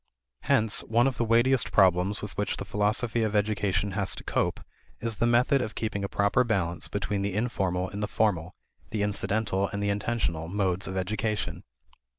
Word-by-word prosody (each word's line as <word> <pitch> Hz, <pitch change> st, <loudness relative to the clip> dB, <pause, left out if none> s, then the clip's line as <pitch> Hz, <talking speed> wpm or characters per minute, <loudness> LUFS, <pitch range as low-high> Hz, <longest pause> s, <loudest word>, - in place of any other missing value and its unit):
Hence 110 Hz, -1 st, +3 dB
one 120 Hz, +2 st, +3 dB
of 135 Hz, -1 st, 0 dB
the -, -, +1 dB
weightiest 120 Hz, +2 st, +3 dB
problems 95 Hz, +2 st, +3 dB
with 105 Hz, -, -6 dB
which 105 Hz, -, -1 dB
the 100 Hz, -, -5 dB
philosophy 105 Hz, +4 st, 0 dB
of 110 Hz, -1 st, 0 dB
education 105 Hz, -1 st, +1 dB
has 100 Hz, 0 st, -1 dB
to -, -, -9 dB
cope -, -, -1 dB, 0.4 s
is 115 Hz, -2 st, -3 dB
the 115 Hz, -, +2 dB
method 125 Hz, +3 st, +3 dB
of 110 Hz, -3 st, -4 dB
keeping 105 Hz, -3 st, -2 dB
a 100 Hz, -, -2 dB
proper 100 Hz, +4 st, +2 dB
balance 95 Hz, -8 st, -1 dB
between 100 Hz, 0 st, -2 dB
the 100 Hz, -1 st, -2 dB
informal 95 Hz, -5 st, -1 dB
and 100 Hz, +2 st, -6 dB
the 105 Hz, -, -1 dB
formal, 90 Hz, -6 st, 0 dB, 0.3 s
the 105 Hz, -2 st, -1 dB
incidental 100 Hz, -1 st, 0 dB
and 100 Hz, +1 st, -4 dB
the 100 Hz, -, +1 dB
intentional, 100 Hz, -6 st, -1 dB
modes 95 Hz, 0 st, -1 dB
of 95 Hz, 0 st, -4 dB
education. 105 Hz, +2 st, -2 dB
105 Hz, 180 wpm, -27 LUFS, 95-110 Hz, 0.4 s, Hence